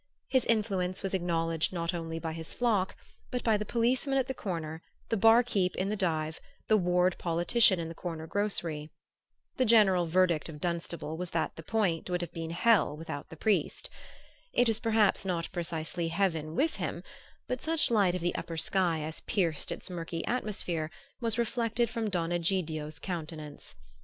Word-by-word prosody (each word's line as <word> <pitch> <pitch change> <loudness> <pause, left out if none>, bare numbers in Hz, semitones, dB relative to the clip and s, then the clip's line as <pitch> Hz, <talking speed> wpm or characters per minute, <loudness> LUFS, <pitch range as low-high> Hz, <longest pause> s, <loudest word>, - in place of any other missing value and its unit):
His 260 -1 +2
influence 195 -5 0
was 195 - -2
acknowledged 165 -3 0
not 170 -1 -1
only 165 -1 -4
by 165 -1 -3
his 160 0 -5
flock, 215 -6 +1 0.3
but 250 - -2
by 225 -2 +4
the 210 0 -1
policeman 250 +5 +1
at 265 - +2
the 265 - -2
corner, 165 -8 -4 0.3
the - - +2
"bar 225 +3 +6
keep'" 195 -7 0
in 190 +1 -1
the 210 - 0
dive, 160 -5 -1 0.3
the 215 - +5
ward 180 -2 +3
politician 175 +4 +4
in 165 - -3
the 165 - -6
corner 165 -2 -5
grocery. 165 -6 -2 0.7
The 255 - +3
general 195 -6 +5
verdict 170 -2 +2
of 150 -2 -8
Dunstable 170 -2 -3
was 180 0 -3
that 165 -2 -1
the - - -8
Point 180 -2 0
would 180 0 0
have 175 - -5
been 165 -1 -4
hell 175 -3 +3
without 150 -3 -6
the 160 - -10
priest. 210 +4 0 0.6
It 245 - +4
was 225 -1 +2
perhaps 220 -4 +3
not 175 -3 -2
precisely 165 -1 -2
heaven 165 -3 0
with 320 - +1
him; - - -3 0.4
but 250 -1 -2
such 320 -5 +2
light 200 -5 +4
of 180 - -3
the 175 +1 0
upper 165 -1 -4
sky 170 -1 +1
as 155 +1 -5
pierced 170 -9 -1
its - - -5
murky 165 -2 -4
atmosphere 180 -9 -2 0.3
was 230 -2 0
reflected 235 -1 0
from 225 -2 -1
Don 175 -3 -1
Egidio's 165 -4 -1
countenance. 160 - -6
180 Hz, 175 wpm, -30 LUFS, 165-215 Hz, 0.7 s, bar